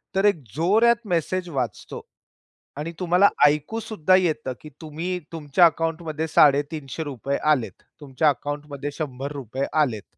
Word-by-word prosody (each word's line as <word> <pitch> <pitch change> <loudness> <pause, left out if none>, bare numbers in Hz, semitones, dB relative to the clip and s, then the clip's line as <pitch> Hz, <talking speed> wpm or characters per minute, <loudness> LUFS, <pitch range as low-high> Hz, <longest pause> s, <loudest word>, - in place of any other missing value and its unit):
तर 195 +1 +2
एक 205 -4 +4 0.2
जोरात 215 +9 +4
मेसेज 180 0 -1
वाचतो 125 - -4 0.8
आणि 155 +3 -4
तुम्हाला 180 +3 +4 0.2
ऐकूसुद्धा 185 +5 +1
येतं, 155 -7 0
की 155 - -10
तुम्ही, 165 +4 -4
तुमच्या 160 +2 +3
अकाउंटमध्ये 160 -1 -1
₹350 145 -2 +1
आलेत, 115 -10 -1 0.2
तुमच्या 145 +2 +1
अकाउंटमध्ये 145 0 -4
₹100 140 -3 -4 0.2
आलेत. 115 -8 -1
155 Hz, 110 wpm, -23 LUFS, 140-175 Hz, 0.8 s, एक